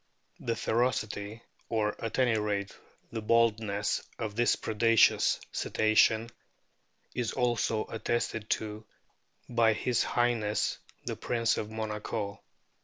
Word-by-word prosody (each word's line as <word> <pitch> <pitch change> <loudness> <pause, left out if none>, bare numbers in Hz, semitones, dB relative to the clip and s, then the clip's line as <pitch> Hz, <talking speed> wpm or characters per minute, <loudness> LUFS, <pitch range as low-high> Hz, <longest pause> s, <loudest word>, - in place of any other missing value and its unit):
The 115 - -2
ferocity, 110 -2 -1 0.3
or 105 -2 0
at 115 - -3
any 125 -3 +3
rate 105 -2 -1 0.4
the 115 - -3
boldness, 110 -2 +2 0.2
of 110 -3 -4
this 120 +1 +3
predaceous 115 +1 +3
Cetacean 110 +1 +2 0.8
is 120 -4 -2
also 120 -3 +1
attested 115 -1 -2
to 105 0 -2 0.6
by 115 -2 +3
his 120 +2 0
High 120 0 +2
ness 105 -2 -1 0.3
the - - -2
Prince 115 -1 0
of 105 - -3
Monaco. 105 -1 -4
110 Hz, 110 wpm, -30 LUFS, 105-115 Hz, 0.8 s, any